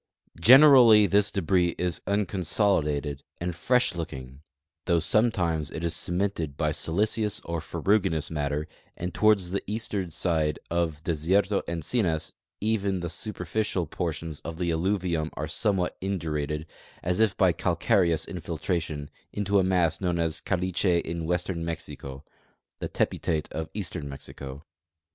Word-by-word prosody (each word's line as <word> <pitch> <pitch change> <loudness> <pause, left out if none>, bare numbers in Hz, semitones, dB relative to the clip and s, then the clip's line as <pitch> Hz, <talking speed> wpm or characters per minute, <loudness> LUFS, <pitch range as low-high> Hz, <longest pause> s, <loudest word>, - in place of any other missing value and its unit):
Generally 125 - +8
this 100 +1 +3
debris 90 -2 +1
is 90 -2 -1
unconsoli 100 -2 +1
dated 70 -1 -3 0.2
and 85 0 -3
fresh 125 +8 +2
looking, 65 -6 -7 0.4
though 85 - +3
sometimes 85 -4 +1
it 80 - -6
is 85 -1 +1
cemented 90 -5 -1
by 75 -2 +1
siliceous 105 +7 0
or 85 -1 -4
ferruginous 95 -3 0
matter, 75 0 -2 0.3
and 90 0 -4
toward 110 -1 +5
the 95 +1 -3
eastern 105 -3 -2
side 80 -2 0
of 85 -3 -1
Desierto 90 +5 +1
Encinas 85 0 -1 0.3
even 100 -3 0
the 85 -1 -3
superficial 95 -1 -2
portions 80 -1 -4
of 80 0 -7
the 85 -1 0
alluvium 85 -2 0
are - - -3
somewhat 100 -5 0
indurated, 75 -5 -2 0.4
as 90 +2 0
if 110 -3 +2
by 95 -2 +5
calcareous 85 -1 +1
infiltration, 80 -3 -3 0.2
into 100 0 +1
a - - +3
mass 90 -3 +1
known 90 -2 0
as 80 -1 -1
caliche 90 -1 +1
in 85 -1 -4
western 90 0 -1
Mexico 75 -4 -6 0.5
(the - - -4
tepitate 75 -2 -1
of 80 0 -4
eastern 90 -7 -4
INIexico). 70 +1 -8
85 Hz, 135 wpm, -27 LUFS, 80-100 Hz, 0.5 s, Generally